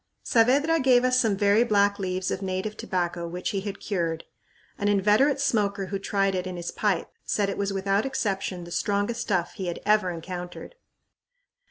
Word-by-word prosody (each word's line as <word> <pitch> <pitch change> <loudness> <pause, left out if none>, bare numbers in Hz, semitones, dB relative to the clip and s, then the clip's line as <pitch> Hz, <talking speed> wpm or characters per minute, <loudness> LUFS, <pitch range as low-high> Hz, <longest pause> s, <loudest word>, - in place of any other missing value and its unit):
Saavedra 280 +8 +3
gave 255 -3 +4
us 255 0 +3
some 220 -5 +2
very 205 +3 +4
black 205 -3 +2
leaves 185 -1 -2
of 190 - -3
native 190 +3 -3
tobacco, 175 -4 -2
which 180 +4 -3
he 195 -2 -2
had 200 0 -6
cured. 170 -5 -2 0.6
An 205 - 0
inveterate 210 +8 +3
smoker 205 -7 0
who 195 - -1
tried 195 0 0
it 185 0 -2
in 185 - -5
his 175 0 -4
pipe 200 -5 0
said 200 -1 0
it - - -5
was 200 0 0
without 195 +1 +1
exception 195 -8 -2
the 170 - -10
strongest 205 +6 -1
stuff 180 -4 0
he 185 -2 -4 0.2
ever 210 -2 +3
had 175 - -4
encountered! 175 - -7
200 Hz, 180 wpm, -26 LUFS, 185-215 Hz, 0.6 s, gave